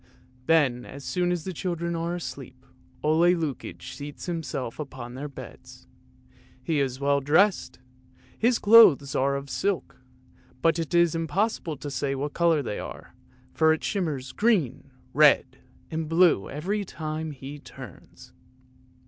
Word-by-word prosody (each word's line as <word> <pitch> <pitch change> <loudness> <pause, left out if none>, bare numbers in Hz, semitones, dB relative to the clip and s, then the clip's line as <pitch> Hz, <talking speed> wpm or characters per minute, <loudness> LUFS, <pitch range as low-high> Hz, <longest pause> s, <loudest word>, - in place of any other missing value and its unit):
Then 140 -7 +3
as 140 +2 -10
soon 180 +2 0
as 175 -3 -2
the 185 - -5
children 170 -1 -3
are 170 +1 -2
asleep, 130 -4 -8 0.4
Ole 165 +4 +4
Lukoie 155 -6 -4
seats 145 0 -8
himself 150 -8 -4
upon 130 -4 -7
their 140 +3 -5
beds. 140 - -12 0.8
He 155 +2 0
is 130 -2 -1
well 140 0 +2
dressed; 175 +8 +2 0.6
his 235 +1 +2
clothes 205 -11 +7
are 140 +1 +1
all - - -1
of 140 - -14
silk, 185 -6 -2 0.6
but 165 +4 +2
it 165 +1 -2
is 170 -2 +4
impossible 165 0 -1
to 145 +1 -7
say 135 +1 -2
what 145 +2 -3
colour 165 -4 +2
they 105 - -4
are, - - -9 0.4
for 160 0 +4
it 160 - -4
shimmers 150 -10 -2
green, 170 - 0 0.2
red, - - +4 0.3
and 160 -1 -3
blue 165 - +3
every 195 +8 -2
time 155 -3 -5
he 140 0 -8
turns. 130 -8 -13
155 Hz, 145 wpm, -26 LUFS, 140-170 Hz, 0.8 s, clothes